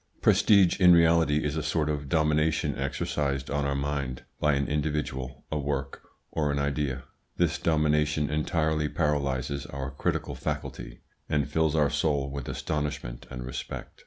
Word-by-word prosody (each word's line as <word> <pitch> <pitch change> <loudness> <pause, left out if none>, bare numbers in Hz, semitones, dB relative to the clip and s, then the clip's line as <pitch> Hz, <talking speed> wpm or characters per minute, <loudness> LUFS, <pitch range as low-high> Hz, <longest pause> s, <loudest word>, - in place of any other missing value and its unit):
Prestige 100 -3 +5
in 90 -2 +8
reality 80 -3 +4
is 75 0 -1
a 80 - -1
sort 75 +1 0
of 75 -2 -2
domination 75 -1 +2
exercised 70 0 -2
on 70 0 0
our 70 - -1
mind 70 -2 -2 0.2
by 75 0 +3
an 70 0 0
individual, 75 -3 -2
a 75 - 0
work, 70 -1 -3 0.3
or 75 -2 0
an 70 - -1
idea. 70 -2 -1 0.3
This 85 -3 +1
domination 75 -1 +2
entirely 75 0 0
paralyses 70 -3 -1
our 70 -1 -5
critical 70 - -2
faculty, - - -5 0.3
and 75 -1 +1
fills 80 +1 +1
our 75 -2 +3
soul 70 -2 0
with 70 -2 -5
astonishment 75 -5 -3
and 60 -1 -6
respect. 65 0 -7
75 Hz, 150 wpm, -28 LUFS, 70-75 Hz, 0.3 s, in